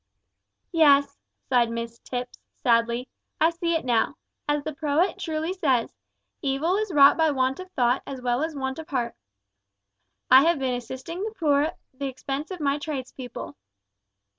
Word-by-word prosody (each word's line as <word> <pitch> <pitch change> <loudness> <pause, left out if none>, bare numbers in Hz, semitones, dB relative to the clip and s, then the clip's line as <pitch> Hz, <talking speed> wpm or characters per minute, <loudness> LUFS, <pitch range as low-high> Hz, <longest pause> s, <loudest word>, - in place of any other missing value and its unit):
"Yes," 285 -4 +4 0.3
sighed 245 -3 +3
Mrs 230 0 -5
Tipps, 250 0 -5 0.2
sadly, 235 +1 +2 0.3
"I 325 - +4
see 335 0 -1
it 320 - -1
now. 240 +3 +1 0.3
As 295 -1 +1
the 310 - -4
poet 310 +4 0
truly 320 +2 -2
says, 270 -10 +1 0.5
`Evil 310 +9 +1
is 430 -3 -3
wrought 280 -3 +7
by 320 -1 +4
want 265 0 0
of 370 0 -8
thought 245 -3 +2
as 270 -2 -5
well 245 +1 0
as 320 0 -2
want 265 +1 -3
of 320 - -9
heart.' 245 -4 -1 1.2
I 260 +1 +10
have 335 +2 +3
been 260 -2 -1
assisting 260 +8 -6
the 435 +1 -4
poor 290 -4 +3
at 320 +4 -2 0.2
the 275 +1 -4
expense 270 +3 -4
of 370 -2 -6
my 285 -1 0
trades 285 -4 -4
people." 250 -2 -8
280 Hz, 165 wpm, -25 LUFS, 255-320 Hz, 1.2 s, I